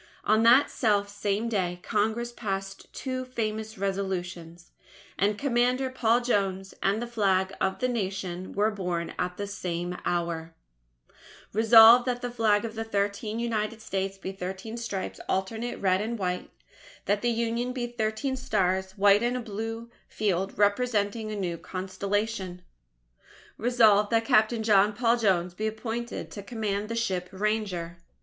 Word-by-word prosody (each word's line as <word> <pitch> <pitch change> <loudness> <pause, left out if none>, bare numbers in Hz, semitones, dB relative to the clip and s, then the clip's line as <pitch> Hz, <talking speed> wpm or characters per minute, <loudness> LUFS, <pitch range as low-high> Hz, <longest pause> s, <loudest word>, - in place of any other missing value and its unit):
On 215 +1 +3
that 245 +5 +6
self 205 -4 +1
same 205 +2 -1
day, 180 -5 -1
Congress 225 +3 0
passed 195 -4 -5
two 255 -1 -4
famous 220 -3 -4
Resolutions; 180 -3 -4 0.4
and 205 +1 +1
Commander 255 +1 +1
Paul 240 -1 +2
Jones 195 -5 -1
and 200 +2 +1
the 240 - -3
Flag 195 -5 +1
of 190 - +1
the 255 - 0
Nation 190 -5 -3
were 210 +2 +1
"born 180 -4 -3
at 180 0 -2
the 205 - -3
same 180 -3 -4
hour": 170 -2 -2 1.0
Resolved: 225 +3 +8
that 245 -1 -1
the 245 - -2
Flag 220 -3 +2
of 225 - -5
the 225 0 -3
Thirteen 205 0 -2
United 225 -1 -2
States 195 -2 -3
be 190 0 -5
thirteen 190 +4 -6
Stripes, 225 -5 -4
alternate 220 +6 -2
red 190 -1 +2
and 230 +2 -3
white; 180 -3 -2 0.6
that 205 +1 +1
the 240 - +1
Union 235 +1 -1
be 250 -1 -3
thirteen 240 +3 -2
Stars, 190 -7 0
white 200 0 +5
in 240 +1 0
a - - -1
blue 225 +1 -5 0.2
field, 195 -2 -1
representing 210 0 +1
a - - -3
new 175 -4 -3
Constellation. 195 0 -3 0.9
Resolved: 220 -4 +4
that 225 -1 +2
Captain 220 +1 +3
John 210 -1 +4
Paul 235 +2 +2
Jones 180 -6 +1
be 215 +4 -2
appointed 225 +2 -4
to 205 - -7
command 210 -1 -3
the 230 - -2
ship 185 -6 -1
Ranger. 190 -4 -2
210 Hz, 150 wpm, -27 LUFS, 190-230 Hz, 1.0 s, Resolved